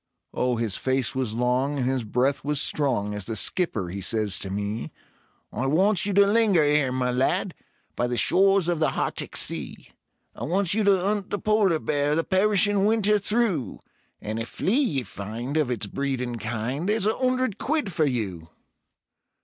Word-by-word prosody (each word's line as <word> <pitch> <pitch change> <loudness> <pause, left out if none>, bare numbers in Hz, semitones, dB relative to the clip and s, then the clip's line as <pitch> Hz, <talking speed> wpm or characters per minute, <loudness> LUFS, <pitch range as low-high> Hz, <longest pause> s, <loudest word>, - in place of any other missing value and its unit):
Oh, 125 -1 0
his 115 -4 -1
face 130 -2 0
was 130 -4 -2
long 125 +4 0
and 130 - -1
his 130 -2 -1
breath 125 +6 0
was 150 0 +1
strong, 120 -10 0
as 105 -2 -4
the 115 - -3
Skipper 110 - -1
he 100 +3 -6
says 105 0 -1
to 95 - -6
me: 105 +3 -4 0.6
"I 125 +5 -2
wants 190 +6 +3
you 200 - -1
to 200 +1 +5
linger 205 -5 +3
'ere, 145 -3 +2
my 125 -1 -1
lad, 165 +9 0 0.4
by 120 - 0
the 120 0 -3
shores 195 - +4
of 175 -2 0
the 160 - +1
Hartic - - -2
Sea; - - -1 0.4
I - - -5
wants 185 +2 +2
you 215 +1 +1
to 195 -2 +3
'unt 205 -2 -1
the - - -2
polar 210 -5 +2
bear 145 -1 0
the 165 - +1
perishin' 200 +1 +2
winter 210 -1 +2
through, 205 - -1 0.4
And 110 +2 -5
if 115 - -5
flea 195 - -1
ye 140 - -1
find 110 +7 -6
of 155 -5 +1
its 120 -4 -2
breed 135 +5 -3
and 120 -2 -4
kind, 120 - -3
there's 215 -1 +1
a 215 - +2
'undred 255 -4 0
quid 290 - -1
for 155 - +2
you." 95 - -4
145 Hz, 185 wpm, -25 LUFS, 120-195 Hz, 0.6 s, to